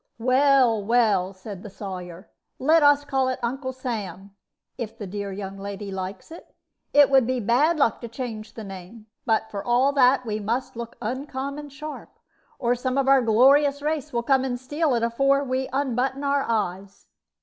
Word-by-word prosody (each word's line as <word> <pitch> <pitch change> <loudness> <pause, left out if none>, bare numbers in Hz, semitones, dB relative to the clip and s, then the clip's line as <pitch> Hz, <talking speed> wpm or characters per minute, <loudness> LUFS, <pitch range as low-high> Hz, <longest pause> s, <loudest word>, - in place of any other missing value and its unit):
"Well, 255 -2 +3
well," 215 -4 +2
said 190 0 -9
the 210 - -9
Sawyer, 185 -2 -8 0.3
"let 315 +5 +4
us 290 0 +5
call 270 -2 0
it 255 - -1
'Uncle 260 +2 -2
Sam,' 205 -7 -6 0.4
if 230 -4 -6
the 205 - -6
dear 200 +1 -5
young 195 0 -7
lady 200 0 -6
likes 190 - -6
it; 335 - -13 0.4
it 290 -1 +7
would 265 -3 +5
be 255 0 0
bad 255 +10 +2
luck 275 -6 +1
to 235 - -5
change 230 -2 -7
the 225 - -7
name; 195 +3 -10 0.2
but, 220 -1 +1
for 200 -1 -5
all 250 +4 +2
that, 260 -1 +4
we 215 -1 -2
must 245 +5 -3
look 235 0 -7
uncommon 275 +4 -4
sharp, 300 +2 -8 0.5
or 240 0 +1
some 255 +2 -2
of 275 -1 +1
our 270 -1 +6
glorious 275 +5 +4
race 305 -2 -2
will 235 -1 -1
come 265 +1 +3
and 245 -2 -2
steal 290 +2 0
it 230 - 0
afore 275 +4 +2
we 260 0 -2
unbutton 265 0 -1
our 280 0 +1
eyes." 200 -3 -3
245 Hz, 180 wpm, -24 LUFS, 210-275 Hz, 0.5 s, it